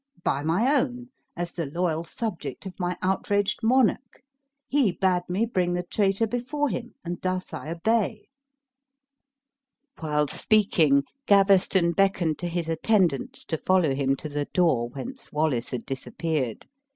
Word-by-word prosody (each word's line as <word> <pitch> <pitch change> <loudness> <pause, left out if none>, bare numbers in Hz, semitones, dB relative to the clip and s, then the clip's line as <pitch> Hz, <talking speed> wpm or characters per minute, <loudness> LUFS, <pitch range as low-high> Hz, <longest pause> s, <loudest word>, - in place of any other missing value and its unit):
"By 140 - 0
my 195 - +2
own, 245 -1 -3 0.3
as 175 0 -3
the 165 -4 -4
loyal 165 +1 -1
subject 210 +2 -5
of 190 - -6
my 180 -1 -1
outraged 200 +2 +1
monarch. 245 +1 +1 0.4
He 270 -8 +3
bade 180 0 0
me 195 +6 +1
bring 180 -6 0
the 180 0 -1
traitor 195 +3 +1
before 255 +6 -1
him; 240 -1 -5
and 175 +1 -4
thus 185 0 -2
I 155 - -6
obey." 215 +4 0 1.7
While 150 -1 0
speaking, 160 -9 +3 0.2
Gaveston 195 -3 +4
beckoned 180 -4 +1
to 175 - -3
his 170 -1 -2
attendants 165 - +1
to 160 - -2
follow 180 -7 +2
him 135 0 +1
to 155 - -7
the 145 -1 -2
door 140 -11 +1
whence 245 - -8
Wallace 150 -6 0
had 125 -2 -5
disappeared. 135 -2 -3
180 Hz, 140 wpm, -26 LUFS, 155-210 Hz, 1.7 s, Gaveston